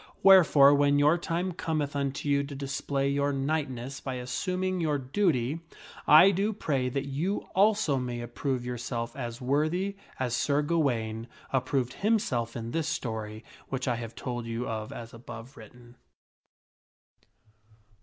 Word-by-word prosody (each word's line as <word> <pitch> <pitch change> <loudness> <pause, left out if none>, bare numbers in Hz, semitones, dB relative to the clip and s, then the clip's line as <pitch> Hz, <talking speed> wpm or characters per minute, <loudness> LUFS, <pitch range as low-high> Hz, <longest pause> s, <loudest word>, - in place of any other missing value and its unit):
Wherefore, 160 -7 +8
when 145 0 +4
your 150 +3 +5
time 175 +2 -2
cometh 155 -4 -2
unto 140 0 -2
you 140 0 +2
to 140 0 -8
display 140 0 -2
your 140 +1 +1
knightness 135 -2 -2
by 130 -2 -5
assuming 185 +9 -2
your 150 -3 +1
duty, 140 -1 0 0.5
I 155 +6 +8
do 200 +3 0
pray 140 -10 -1
that 135 +2 -2
you 155 +9 -1
also 200 -7 +3
may 125 -2 -3
approve 120 +1 -3
yourself 120 -1 -4
as 120 -3 -5
worthy 155 +9 0 0.2
as 125 -2 0
Sir 145 +3 +1
Ga 170 +3 +1
waine 115 -5 -1 0.3
approved 130 -1 0
himself 130 - 0
in 115 0 -5
this 165 +1 -1
story 110 -2 -4 0.2
which 135 -1 -3
I 120 -2 +1
have 115 -1 -7
told 120 -2 -4
you 115 +2 -3
of 110 -1 -4
as 115 -1 -8
above 115 +2 -10
written. 120 +1 -14
135 Hz, 145 wpm, -28 LUFS, 120-155 Hz, 0.5 s, Wherefore